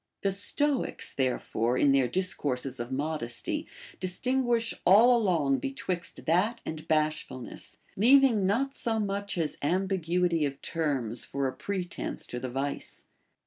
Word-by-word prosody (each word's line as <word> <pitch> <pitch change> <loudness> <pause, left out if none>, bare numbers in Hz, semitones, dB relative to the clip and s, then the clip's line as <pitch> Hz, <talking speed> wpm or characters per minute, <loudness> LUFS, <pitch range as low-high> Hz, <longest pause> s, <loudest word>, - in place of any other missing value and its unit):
The 195 - +1
Stoics, 275 +8 0
there 130 -2 +1
fore, 120 +3 -1
in 140 - +4
their 135 -2 +3
discourses 135 -6 -1
of 120 +2 -5
modesty, 140 -4 -2 0.3
distinguish 235 +5 0
all 225 +7 +7
along 165 - +2
betwixt 185 -11 -4
that 190 +8 +2
and 155 -1 -6
bashfulness, 155 -5 -2 0.2
leaving 235 -2 +5
not 265 +7 +1
so 225 -4 -1
much 200 -1 -2
as 160 -3 -1
ambiguity 180 -1 +1
of 140 -1 -2
terms 135 -8 -1
for 140 0 -2
a 130 - -3
pretence 185 -3 -4
to 125 - -4
the 130 - -4
vice. 135 +3 -4
175 Hz, 135 wpm, -29 LUFS, 140-205 Hz, 0.3 s, all